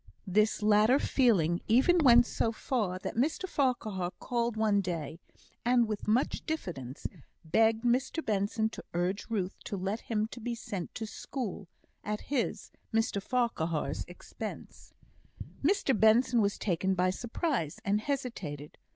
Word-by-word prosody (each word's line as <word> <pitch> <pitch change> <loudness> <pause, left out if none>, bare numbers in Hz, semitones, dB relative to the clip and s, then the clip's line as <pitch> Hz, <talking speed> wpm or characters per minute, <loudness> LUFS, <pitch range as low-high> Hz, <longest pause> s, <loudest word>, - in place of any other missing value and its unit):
This 210 +3 +2
latter 215 +4 +5
feeling 190 - +2
even 270 +10 +5
went 240 -5 +7
so 225 - 0
far 215 -5 -1
that 185 - -5
Mr 305 +10 0
Farquhar 225 - 0
called 235 -2 -1
one 210 -2 +3
day, 165 -4 -4 0.4
and 240 -1 +3
with 215 -1 -4
much 230 +6 +1
diffidence 145 - -5 0.4
begged 220 +7 +3
Mr 260 +6 +1
Benson 210 +1 +1
to - - -9
urge 180 +3 -1
Ruth 195 -4 -2
to 200 - -3
let 195 +4 -2
him 215 -2 -1
be 240 +1 -3
sent 195 -5 -6
to 220 - -3
school 215 -3 -5 0.4
at 210 0 -3
his 255 - -1 0.2
(Mr 225 -3 +1
Farquhar's) 170 - -1
expense. 175 - -9 0.7
Mr 305 -5 +2
Benson 225 +2 +4
was 200 -1 +1
taken 190 0 0
by 185 0 +2
surprise, 235 - -2
and 205 +2 +2
hesitated. 205 - -4
215 Hz, 135 wpm, -30 LUFS, 185-245 Hz, 0.7 s, went